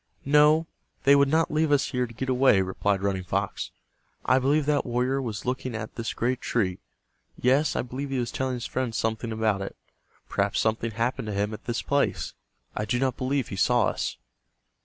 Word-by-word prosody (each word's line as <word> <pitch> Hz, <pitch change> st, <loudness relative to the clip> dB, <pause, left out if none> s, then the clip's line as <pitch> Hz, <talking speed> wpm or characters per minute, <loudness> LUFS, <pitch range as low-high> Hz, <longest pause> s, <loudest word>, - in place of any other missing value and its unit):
"No, 150 Hz, +3 st, +5 dB, 0.4 s
they 140 Hz, +1 st, +7 dB
would 140 Hz, 0 st, +5 dB
not 160 Hz, +2 st, +2 dB
leave 155 Hz, 0 st, +1 dB
us 145 Hz, -1 st, +2 dB
here 125 Hz, -2 st, 0 dB
to 115 Hz, -, -12 dB
get 130 Hz, +4 st, -3 dB
away," 130 Hz, -5 st, +4 dB
replied 95 Hz, +1 st, -1 dB
Running 95 Hz, -2 st, 0 dB
Fox. 90 Hz, -, -2 dB, 0.6 s
"I 130 Hz, +2 st, +4 dB
believe 140 Hz, +3 st, +2 dB
that 150 Hz, 0 st, +2 dB
warrior 125 Hz, +2 st, 0 dB
was 110 Hz, -5 st, -5 dB
looking 125 Hz, -1 st, -2 dB
at 110 Hz, -1 st, -5 dB
this 115 Hz, -1 st, -4 dB
great 125 Hz, +2 st, 0 dB
tree. 95 Hz, -6 st, 0 dB, 0.6 s
Yes, 135 Hz, +5 st, +3 dB
I -, -, 0 dB
believe 130 Hz, +3 st, -5 dB
he 135 Hz, -, -1 dB
was 120 Hz, -1 st, -1 dB
telling 130 Hz, -1 st, -1 dB
his 120 Hz, -, -5 dB
friend 125 Hz, -3 st, -2 dB
something 115 Hz, +1 st, -1 dB
about 110 Hz, -3 st, 0 dB
it. 95 Hz, -, -5 dB, 0.5 s
Perhaps -, -, 0 dB
something 110 Hz, +1 st, 0 dB
happened 115 Hz, +2 st, -2 dB
to 105 Hz, -, -3 dB
him 105 Hz, +2 st, 0 dB
at 110 Hz, -, -9 dB
this 120 Hz, -1 st, -2 dB
place. 140 Hz, 0 st, 0 dB, 0.4 s
I 105 Hz, -, -1 dB
do 120 Hz, +4 st, 0 dB
not 130 Hz, -1 st, 0 dB
believe 130 Hz, 0 st, -1 dB
he -, -, -5 dB
saw 120 Hz, +4 st, +3 dB
us." -, -, -3 dB
125 Hz, 200 wpm, -26 LUFS, 110-135 Hz, 0.6 s, they